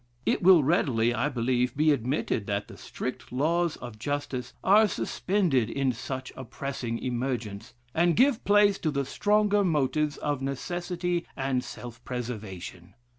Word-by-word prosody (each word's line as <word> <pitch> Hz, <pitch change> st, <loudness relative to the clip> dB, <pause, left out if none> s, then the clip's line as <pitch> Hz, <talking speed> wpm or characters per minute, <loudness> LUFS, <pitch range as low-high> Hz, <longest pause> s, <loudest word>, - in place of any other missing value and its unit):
It -, -, +1 dB
will 180 Hz, -4 st, +7 dB
readily, 125 Hz, -6 st, +2 dB
I 120 Hz, +5 st, 0 dB
believe, 125 Hz, 0 st, 0 dB
be 155 Hz, +1 st, +4 dB
admitted 125 Hz, -5 st, -1 dB
that 100 Hz, 0 st, -2 dB
the -, -, -11 dB
strict -, -, -6 dB
laws 165 Hz, +6 st, +1 dB
of 120 Hz, -3 st, -9 dB
justice 140 Hz, -2 st, -3 dB
are 210 Hz, +3 st, +6 dB
suspended 175 Hz, -, 0 dB
in 135 Hz, 0 st, 0 dB
such 130 Hz, +2 st, -6 dB
a 130 Hz, -, -7 dB
pressing 125 Hz, -2 st, -4 dB
emergence, 120 Hz, -3 st, -3 dB, 0.2 s
and 170 Hz, 0 st, +3 dB
give 255 Hz, -1 st, +3 dB
place 205 Hz, -1 st, +4 dB
to 160 Hz, -, 0 dB
the 140 Hz, -2 st, -1 dB
stronger 205 Hz, +6 st, +2 dB
motives 150 Hz, -2 st, +1 dB
of 145 Hz, -2 st, -2 dB
necessity 175 Hz, +5 st, -2 dB
and 135 Hz, -2 st, 0 dB
self 120 Hz, 0 st, -9 dB
preservation. 105 Hz, -8 st, -6 dB
135 Hz, 145 wpm, -27 LUFS, 120-175 Hz, 0.2 s, will